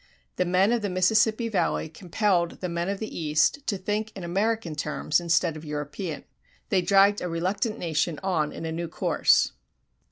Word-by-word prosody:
The 180 - +2
men 185 +4 +3
of 240 -1 +1
the 205 - -2
Mississippi 215 +5 +2
Valley 200 -6 0
compelled 175 +1 -1
the 180 - -3
men 170 +2 -2
of 200 - -2
the 215 +2 -6
East 155 - +1
to 200 - 0
think 210 +3 -2
in 190 - -7
American 195 0 -1
terms 150 +1 0
instead 170 -1 +1
of 155 - -9
European. 150 +3 -5 0.5
They 190 -3 +3
dragged 200 +3 +4
a 180 - -3
reluctant 195 +7 -1
nation 160 -3 -1
on 160 -6 0
in - - -7
a 160 - -3
new 170 +1 -3
course. 160 - +2
180 Hz, 180 wpm, -26 LUFS, 165-205 Hz, 0.5 s, dragged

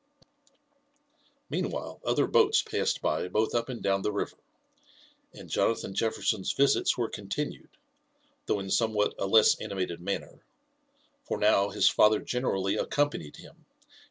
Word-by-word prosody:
Meanwhile - - -4
other - - +2
boats 440 -1 +3
passed - - -2
by - - 0
both 110 +4 0
up 120 +2 -1
and 125 -3 -6
down 95 0 +1
the 105 - -1
river, 100 - -4 0.9
and - - -12
Jonathan 115 -3 0
Jefferson's 110 -2 -1
visits 140 0 +2
were 120 -2 0
continued, 105 +10 -5 0.8
though 105 - +1
in 95 -1 -6
somewhat 110 -3 +1
a 95 - -1
less 110 +2 +5
animated 90 -3 -4
manner; 100 +2 -5 0.8
for - - -3
now 100 -1 +3
his 100 - +2
father 105 0 +4
generally 100 -6 -1
accompanied 145 - -1
him, - - -14
and - - -31
105 Hz, 135 wpm, -28 LUFS, 95-115 Hz, 0.9 s, less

